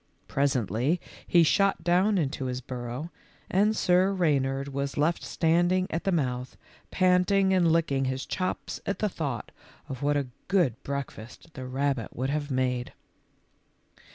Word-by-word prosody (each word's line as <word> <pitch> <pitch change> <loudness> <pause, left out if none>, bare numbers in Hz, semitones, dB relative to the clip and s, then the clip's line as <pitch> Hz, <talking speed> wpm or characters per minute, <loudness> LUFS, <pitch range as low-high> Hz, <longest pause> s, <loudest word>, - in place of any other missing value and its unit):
Presently 135 - +1 0.3
he 170 -1 +5
shot 195 +2 +2
down 185 +4 +3
into 140 -4 -1
his 125 -1 -2
burrow, 125 +5 -6 0.4
and 210 +3 +3
Sir 185 +1 +3
Reynard 140 -7 +1
was 140 0 -3
left 155 +4 +1
standing 175 +2 +2
at 165 - -3
the 195 - +2
mouth, 130 -6 -2 0.3
panting 185 +1 +3
and 175 -3 +4
licking 150 -5 +1
his 130 0 -2
chops 185 -1 -3
at 200 - -1
the 210 - 0
thought 140 - -4 0.4
of 130 -2 -6
what 145 0 +2
a 140 - 0 0.2
good 165 - +2
breakfast 140 +1 -7
the 130 -2 -7
rabbit 135 -2 -1
would 130 +3 -1
have 150 0 -2
made. 130 -2 -1
145 Hz, 145 wpm, -27 LUFS, 130-180 Hz, 0.4 s, he